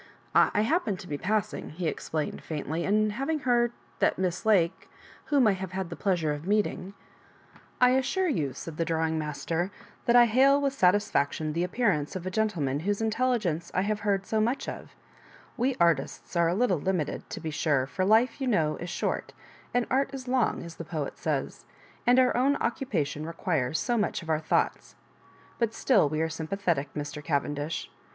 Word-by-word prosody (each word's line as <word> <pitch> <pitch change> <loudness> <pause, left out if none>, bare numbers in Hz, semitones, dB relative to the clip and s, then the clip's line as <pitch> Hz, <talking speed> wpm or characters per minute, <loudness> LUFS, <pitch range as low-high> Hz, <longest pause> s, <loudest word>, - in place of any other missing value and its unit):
'> - - -27
^'I 210 - +4
happened 230 - 0
to 180 - -10
be 150 - -3
passing," 210 -4 -2
be 180 - -3
explain 155 -1 -2
ed, - - -10
faintly, 160 +2 -3
and 215 +1 +2
having 275 +8 -1
heard 240 -2 +2 0.3
that - - +2
Miss 185 +2 -2
Lake, 190 -3 +2 0.4
whom 280 -4 +3
I 215 - +5
have 190 -1 -4
had 190 -2 -3
the - - -4
pleasure 170 -7 0
of 145 +4 -7
meet 210 +1 +3
ing 195 +1 -7 0.3
*" - - -29
*' - - -26
I 250 0 +6
assure 265 +9 +1
you," 150 - -1
said 155 +4 -8
the 165 - +1
drawing 160 -1 0
master, 160 +4 -2 0.2
*' - - -27
that 235 - +4
I 240 0 +9
hail 265 +5 +5
with 280 -1 0
satisfaction 180 - +2
the 170 +2 0
appearance 180 -7 0
of 185 -1 -5
a 185 - -3
gentleman 175 -10 0
whose 200 +5 -1
intelligenoe 220 -7 0
I 185 - +2
have 210 +1 -1
heard 200 -2 0
so 220 +2 0
much 240 +5 0
of - - -7 0.6
We 255 +2 0
artists 170 -1 +1
are 170 -1 +4
a 175 - 0
little 200 -6 +2
limited, 180 -3 -2
to - - -5
be 160 -1 -4
sure; 145 -3 +1
for 185 +7 -2
life, 225 +7 +3
you 265 - 0
know, 160 -10 +1
is 175 - -6
short, - - -2 0.4
and 245 -1 +1
art 270 +2 +2
is 260 -1 -8
long, 250 -2 +1
as 170 -1 -10
the - - -5
poet 155 -3 -4
sajrs^ - - -2 0.4
and 245 +1 +6
our 255 -1 +4
own 270 +4 +3
occupa 240 - -1
tion 150 +2 -6
requires 160 -5 -1
so 240 -1 0
much 205 - -1
of 160 - -3
our 155 - +2
thoughts. 160 - -1 0.6
But 230 -2 0
still 200 - +3
we 155 +1 -1
are 160 - +1
sympathetic, 160 -2 -2
Mr. 145 0 -5
Cavendish. 145 +1 -2
185 Hz, 200 wpm, -28 LUFS, 160-230 Hz, 0.6 s, I